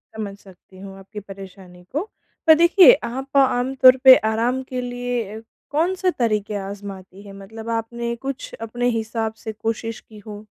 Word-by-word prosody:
समझ 200 Hz, -2 st, -6 dB
सकती 185 Hz, 0 st, -18 dB
हूँ 195 Hz, 0 st, -10 dB
आपकी 210 Hz, +2 st, -10 dB
परेशानी 190 Hz, -2 st, -13 dB
को। 335 Hz, +10 st, -3 dB, 0.4 s
पर 315 Hz, -, +9 dB
देखिए, 350 Hz, +6 st, +7 dB
आप 270 Hz, +3 st, -4 dB
आम 260 Hz, -1 st, +2 dB
तौर 255 Hz, 0 st, +8 dB
पे 260 Hz, -1 st, +10 dB, 0.2 s
आराम 245 Hz, +4 st, 0 dB
के 255 Hz, -1 st, -3 dB
लिए 245 Hz, -1 st, -3 dB
अ, -, -, -10 dB, 0.3 s
कौन-से 365 Hz, +4 st, 0 dB
तरीक़े 215 Hz, -5 st, -1 dB
आज़माती 195 Hz, -1 st, -9 dB
हैं? 200 Hz, -1 st, -12 dB
मतलब 220 Hz, +3 st, -10 dB
आपने 235 Hz, +1 st, -3 dB
कुछ 275 Hz, -1 st, -5 dB
अपने 245 Hz, +2 st, -2 dB
हिसाब 225 Hz, -1 st, -3 dB
से 220 Hz, -, -3 dB
कोशिश 225 Hz, +1 st, -4 dB
की 215 Hz, -1 st, -16 dB
हो। 210 Hz, 0 st, -9 dB
225 Hz, 165 wpm, -21 LUFS, 200-255 Hz, 0.4 s, पे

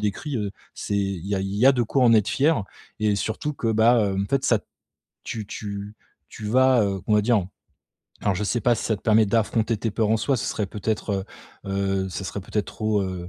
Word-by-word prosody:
décris, 105 Hz, +7 st, -2 dB
heu, 105 Hz, -3 st, -3 dB, 0.2 s
c'est 100 Hz, -, -3 dB
il 95 Hz, -3 st, -2 dB
y 100 Hz, -, -1 dB
a 95 Hz, -, 0 dB
il 95 Hz, +1 st, -3 dB
y 125 Hz, -, +4 dB
a 135 Hz, -, +8 dB
de 125 Hz, -2 st, +1 dB
quoi 125 Hz, +3 st, +1 dB
en 115 Hz, -, +6 dB
être 105 Hz, -2 st, +3 dB
fier 145 Hz, -5 st, +2 dB, 0.4 s
et 105 Hz, -1 st, +2 dB
surtout 110 Hz, +8 st, -2 dB
que 115 Hz, -5 st, -2 dB
bah, 115 Hz, +3 st, +5 dB, 0.2 s
heu, -, -, -3 dB
en -, -, -3 dB
fait 135 Hz, -1 st, +1 dB
ça -, -, +3 dB
t' -, -, -35 dB, 0.6 s
tu 110 Hz, -3 st, -5 dB
tu 100 Hz, 0 st, -6 dB, 0.3 s
tu -, -, -10 dB
vas, 130 Hz, +1 st, +4 dB
heu, 100 Hz, -1 st, -1 dB
qu'on 110 Hz, -, -1 dB
va 105 Hz, -, +4 dB
dire 105 Hz, -4 st, +2 dB, 0.8 s
alors 100 Hz, -, +1 dB
je 105 Hz, -, -2 dB
sais 120 Hz, +4 st, 0 dB
pas 120 Hz, +1 st, +3 dB
si -, -, -4 dB
ça 110 Hz, -, 0 dB
te -, -, -18 dB
permet 110 Hz, 0 st, +4 dB
d'affronter 115 Hz, +1 st, +1 dB
tes 110 Hz, +2 st, -2 dB
peurs 105 Hz, +2 st, 0 dB
en 110 Hz, -, +3 dB
soi, 130 Hz, +5 st, 0 dB
ce 125 Hz, -, -3 dB
serait 105 Hz, -, -2 dB
peut-être, 105 Hz, -1 st, -2 dB, 0.4 s
heu -, -, -5 dB
heu, 95 Hz, -1 st, 0 dB
ça 95 Hz, +1 st, -5 dB
serait 100 Hz, -, -4 dB
peut-être 100 Hz, +2 st, -3 dB
trop, 110 Hz, -2 st, -1 dB
heu, 90 Hz, -2 st, -5 dB
105 Hz, 245 wpm, -24 LUFS, 100-115 Hz, 0.8 s, a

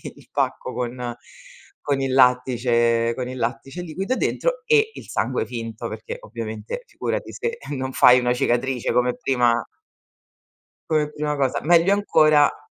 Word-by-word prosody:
il -, -, -18 dB
pacco -, -, -2 dB
con 125 Hz, -1 st, -4 dB, 0.7 s
con 140 Hz, -2 st, -1 dB
il 135 Hz, -1 st, -1 dB
lattice 120 Hz, -2 st, +3 dB
con 125 Hz, -1 st, -4 dB
il 130 Hz, -, -6 dB
lattice 135 Hz, +7 st, -4 dB
liquido 190 Hz, +9 st, -3 dB
dentro, -, -, -1 dB
e 445 Hz, -1 st, +3 dB
il -, -, -10 dB
sangue 115 Hz, +2 st, -1 dB
finto, 115 Hz, -1 st, -6 dB
perché 110 Hz, 0 st, -7 dB
ovviamente 110 Hz, -, -6 dB
figurati -, -, -4 dB
se 470 Hz, +1 st, -3 dB, 0.2 s
non 130 Hz, 0 st, -4 dB
fai 125 Hz, +1 st, +7 dB
una 125 Hz, 0 st, +1 dB
cicatrice 125 Hz, +1 st, 0 dB
come 125 Hz, 0 st, +2 dB
prima 120 Hz, -3 st, +1 dB, 1.3 s
come 150 Hz, -2 st, +1 dB
prima 150 Hz, 0 st, -2 dB
cosa. 135 Hz, -2 st, 0 dB
Meglio 170 Hz, +4 st, +5 dB
ancora 155 Hz, -8 st, +3 dB
130 Hz, 140 wpm, -22 LUFS, 120-150 Hz, 1.3 s, fai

